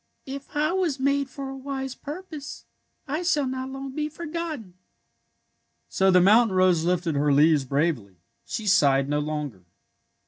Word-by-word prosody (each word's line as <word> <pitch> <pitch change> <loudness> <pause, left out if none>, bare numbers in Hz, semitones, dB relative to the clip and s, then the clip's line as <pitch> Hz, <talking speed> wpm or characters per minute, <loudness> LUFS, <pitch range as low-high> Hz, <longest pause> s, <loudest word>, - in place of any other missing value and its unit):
If 275 +1 -8
I 305 +2 +2
was 350 -7 0
made 280 0 +1
for 275 +1 -7
a 270 - -6
wise 270 -1 -5
purpose 305 0 -8 0.4
I 300 +4 -2
shall 305 -5 +1
not 260 0 -4
long 270 0 -6
be 300 +2 -3
forgot 335 +1 -4
ten." 195 -6 -13 1.2
So 190 0 +2
the 180 -1 +6
mountain 205 +2 +5
rose 185 -3 +4
lifted 175 -2 0
her 145 +1 +2
leaves 145 0 +4
bravely. 140 - -1 0.3
She 220 - -5
sighed 140 -8 +4
no 145 +1 0
longer. 150 -10 -4
245 Hz, 160 wpm, -25 LUFS, -, 1.2 s, the